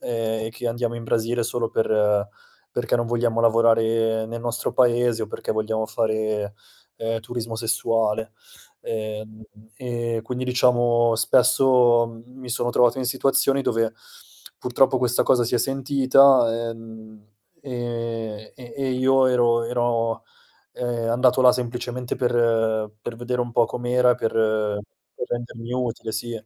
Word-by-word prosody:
ehm, 110 -2 -2
e - - -5
che 115 +2 -6
andiamo 120 0 -2
in 115 - -7
Brasile 115 +1 0
solo 120 0 -2
per 105 -2 +1 0.4
perché - - 0
non 120 0 -1
vogliamo 115 -1 0
lavorare 115 -1 +2
nel 115 +1 -6
nostro 120 0 -3
paese 120 -2 +2
o - - -2
perché - - -4
vogliamo 110 0 -2
fare, 110 -2 -2 0.4
ehm, 115 0 -2
turismo 115 0 -5
sessuale, 110 -1 -1 0.5
ehm, 110 0 -6 0.3
e 120 -2 -3
quindi 125 +3 -4
diciamo 120 -2 +3
spesso 120 -1 +3
mi 125 0 -12
sono 120 +1 -1
trovato 120 +1 +3
in 130 - -2
situazioni 135 +1 +1
dove 115 -2 0 0.6
purtroppo 130 +1 +2
questa 125 -1 +1
cosa 125 - +3
si 115 - -2
è - - +1
sentita, 130 -2 +3
ehm, 110 -2 -12 0.4
e 115 -4 -5
e 120 -2 -12
e 135 -1 -2
io 130 +1 +3
ero 120 -2 +2
ero, 115 -1 -1 0.5
ehm, 120 -2 -2
andato 125 +2 +3
là 125 -1 +7
semplicemente 125 0 -4
per 115 -3 +1
per 115 - -6
vedere 125 +1 -3
un 120 0 -3
po' 120 - +4
com'era, 125 0 +1
per 115 - -2 0.9
per - - -3
rendermi 120 0 -5
utile, 120 -3 -3
sì. 120 +2 -4
115 Hz, 140 wpm, -23 LUFS, 115-125 Hz, 0.9 s, là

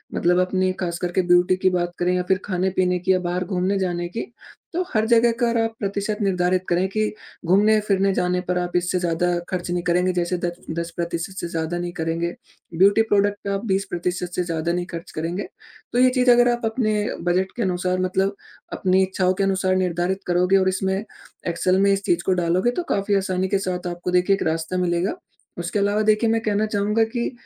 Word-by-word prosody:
मतलब 175 +1 +2
अपनी 185 0 +1
खास 170 -2 -2
करके 180 +1 0
ब्यूटी 175 +1 +4
की 185 - +4
बात 175 -1 -1
करें 180 +1 +1
या 180 - +1
फिर 190 0 +3
खाने-पीने 185 -1 0
की 185 +2 0
या 185 - +4
बाहर 180 0 -2
घूमने 190 +1 0
जाने 175 -2 -1
की, 225 - -4 0.5
तो 360 +2 0
हर 215 -1 +2
जगह 235 0 +5
का 240 -1 +2
अर 235 - 0
आप 225 0 -1
प्रतिशत 200 +1 -2
निर्धारित 185 -2 +1
करें 180 +2 +2
कि 215 +2 0 0.3
घूमने-फिरने 200 +1 +3
जाने 180 0 0
पर 180 - +1
आप 175 0 -3
इससे 180 +1 +1
ज़्यादा 175 0 0
खर्च 180 -1 -3
नहीं 175 0 -1
करेंगे, 180 +1 +2
जैसे 175 0 -1
दच 175 0 -3 0.2
10% 170 +1 -4
से - - -3
ज़्यादा 165 0 -3
नहीं 175 0 -3
करेंगे। 165 +1 -2 0.4
ब्यूटी 200 +4 +5
प्रोडक्ट 205 0 +3
पे 200 - -3
आप 195 +3 -3
20% 180 -3 -2
से 180 - 0
ज़्यादा 165 -1 -2
नहीं 175 0 -2
खर्च 170 +1 -7
करेंगे। 170 +5 -3 0.5
तो 245 - +2
ये 255 - +6
चीज़ 250 -1 +3
अगर 245 0 +5
आप 240 0 -2
अपने 220 -1 0 0.3
बजट 185 +2 +1
के 240 - -3
अनुसार 185 -1 0
मतलब 190 +2 0 0.4
अपनी 190 0 +2
इच्छाओं 185 -1 +1
के 195 - -1
अनुसार 190 -1 +1
निर्धारित 185 +1 -1
करोगे 180 +2 +3
और 190 0 +3
इसमें 190 0 -1 0.5
एक्सेल 185 +2 +1
में 200 0 +4
इस 195 0 -2
चीज़ 175 0 +1
को 190 - +3
डालोगे 180 +8 +2
तो 345 - -3
काफ़ी 200 +1 0
आसानी 190 -1 -1
के 200 - +2
साथ 180 -1 -2
आपको 175 +1 -4
देखिए 180 +2 +3
एक - - -3
रास्ता 165 +3 -3
मिलेगा। 175 +1 0 0.4
उसके 175 +4 -2
अलावा 205 +1 +1
देखिए 215 +1 +3
मैं 225 0 +2
कहना 215 -1 0
चाहूँगा 210 +1 +1
कि, 235 +1 -3
185 Hz, 205 wpm, -22 LUFS, 175-200 Hz, 0.5 s, ये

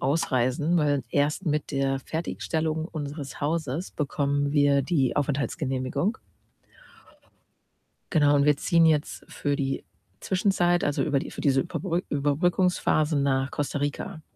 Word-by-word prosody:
ausreisen, 135 +2 +1
weil 145 -4 +2
erst 150 +5 0
mit 150 -1 -1
der 135 -1 0
Fertigstellung 160 +1 -2
unseres 145 -3 -6
Hauses 155 +2 -2
bekommen 145 -1 -1
wir 145 -2 +4
die 135 -4 0
Aufenthaltsgenehmigung. 140 - -1 1.9
Genau, 145 -4 +4
und 140 - +4
wir 150 -1 +4
ziehen 165 +2 +3
jetzt 155 -2 0
für 145 -1 -1
die 135 -1 -2 0.4
Zwischenzeit 180 -2 +1
also, 145 - 0
über 145 -3 +1
die - - -5
für - - -8
diese 135 -2 +3
Überbrück 175 +1 -2
Überbrückungsphase 155 +1 +1
nach 135 -1 +1
Costa 145 0 -2
Rica, 145 +2 -4
145 Hz, 125 wpm, -26 LUFS, 140-160 Hz, 1.9 s, wir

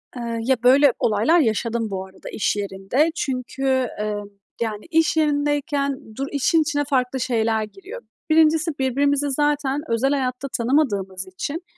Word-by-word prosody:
Eee, 235 -1 -4
ya, 265 +2 +3
böyle 265 +1 +6
olaylar 225 +11 +3
yaşadım 230 -3 0
bu 190 -1 -4
arada, 190 0 -12
iş 210 - 0
yerinde. 205 +10 0
Çünkü, 260 0 -4 0.4
eee, 210 0 -1 0.5
yani, 215 -2 -3
iş 320 -1 +2
yerindeyken 290 -5 0
dur 275 +1 -3
işin 295 +3 +2
içine 295 -2 0
farklı 260 -1 0
şeyler 225 -3 0
giriyor. 390 - -10 0.3
1'incisi, 315 0 +4
birbirimizi 280 +2 +1
zaten 290 0 0
özel 230 +4 +1
hayatta 260 -1 -1
tanımadığımız 205 -8 0
için 285 - -5
265 Hz, 140 wpm, -22 LUFS, 225-290 Hz, 0.5 s, böyle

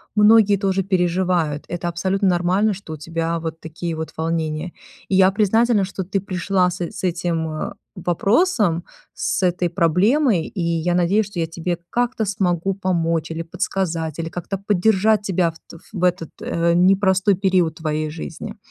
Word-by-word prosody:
многие 210 -1 +6
тоже 195 -1 0
переживают. 180 -4 0
Это 175 0 -4
абсолютно 190 +3 0
нормально, 185 +4 +2
что 180 -4 -8
у - - -6
тебя 165 +2 -2
вот 160 0 -5
такие 165 +1 -5
вот 160 0 -5
волнения. 160 0 -2 0.4
И 190 - +1
я 190 0 +6
признательна, 215 +1 +3
что 190 0 -5
ты 195 +2 -1
пришла 185 -1 0
с 180 - -6
с 175 - -5
этим, 170 -2 -1
э, 155 +5 -4 0.2
вопросом, 185 - +1 0.3
с - - -1
этой 180 0 +1
проблемой, 180 - +2
и 185 - -5
я 170 +1 0
надеюсь, 190 +5 +2
что 195 -3 -7
я 165 - 0
тебе 170 +1 -3
как-то 245 -1 0
смогу 195 -2 0
помочь 165 -4 -1
или 165 +1 -3
подсказать, 165 -2 -2
или 165 0 -3
как-то 180 +3 -5
поддержать 205 +2 +2
тебя 180 -4 +1
в - - -24 0.4
в 180 - -4
этот, 180 -3 +1
э, 170 0 +1
непростой 190 +2 +4
период 185 -4 +1
твоей 155 -1 -2
жизни. 160 +1 -7
180 Hz, 160 wpm, -21 LUFS, 165-195 Hz, 0.4 s, многие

